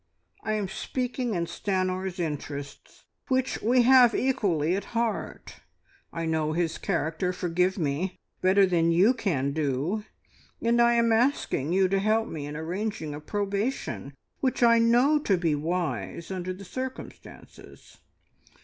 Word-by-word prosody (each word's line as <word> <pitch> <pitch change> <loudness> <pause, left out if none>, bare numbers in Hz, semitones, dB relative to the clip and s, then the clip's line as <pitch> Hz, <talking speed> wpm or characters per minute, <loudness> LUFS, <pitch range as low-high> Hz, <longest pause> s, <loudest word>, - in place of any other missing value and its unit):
I 215 - -1
am 210 -2 -1
speaking 250 +2 -3
in 170 -1 0
Stanor's 185 0 -2
interests, 145 -3 -6 0.2
which 260 -1 0
we 245 +3 +4
have 250 -1 +6
equally 185 - +1
at 200 +3 -5
heart. 230 -2 -3 0.5
I 165 0 -4
know 160 -1 0
his 165 -1 -1
character 165 +4 -1
forgive 180 +1 0
me! 165 +3 -2 0.2
better 190 +2 +5
than 170 -2 +2
you 190 +9 +5
can 165 - -1
do, 155 +7 -1 0.6
and 235 +1 +2
I 235 0 +5
am 230 -1 +3
asking 225 - +1
you 190 0 +4
to 195 +1 +1
help 220 +3 +1
me 145 -2 -6
in 145 - -6
arranging 175 -1 -3
a 145 - -6
probation 205 - -3 0.2
which 260 -2 0
I 230 -1 +6
know 245 +6 +4
to 200 -10 +1
be 170 -3 +1
wise 155 - -3
under 185 -1 -3
the 190 +2 -8
circumstances. 260 +6 -9
190 Hz, 140 wpm, -27 LUFS, 165-230 Hz, 0.6 s, have